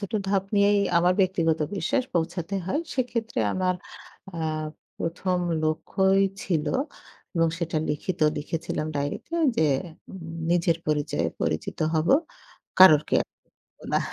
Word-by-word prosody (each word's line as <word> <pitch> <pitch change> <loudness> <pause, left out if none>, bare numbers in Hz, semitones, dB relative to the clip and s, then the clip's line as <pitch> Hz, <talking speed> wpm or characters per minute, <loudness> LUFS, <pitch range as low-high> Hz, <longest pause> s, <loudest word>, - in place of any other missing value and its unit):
ছোট 200 - -6 0.2
ধাপ 195 -1 +1
নিয়েই 205 0 +4 0.2
আমার 175 +1 +4
ব্যক্তিগত 170 -4 +2 0.2
বিশ্বাস 255 +6 0
পৌঁছাতে 175 +2 -1
হয়। 285 +11 0
সেক্ষেত্রে 235 - -1
আমার 185 -1 +1 0.6
আ - - -4 0.6
১ম, 180 +2 -1 0.3
লক্ষ্যই 190 +5 +2 0.2
ছিল 160 -4 -1 0.7
এবং 165 -1 +3
সেটা 170 -2 -2
লিখিত 160 +4 -3 0.2
লিখেছিলাম 155 0 -3
ডাইরিতে 145 - -3 0.2
যে, 160 - +3 0.4
উম 190 - -9 0.3
নিজের 170 -1 +2
পরিচয়ে 150 -1 0
পরিচিত 80 - -2 0.2
হবো। 160 +10 +4 0.6
কারোর 155 -5 +9
কেয়ার - - +2 0.5
করব - - -36
না। - - +5
175 Hz, 125 wpm, -26 LUFS, 160-195 Hz, 0.7 s, কারোর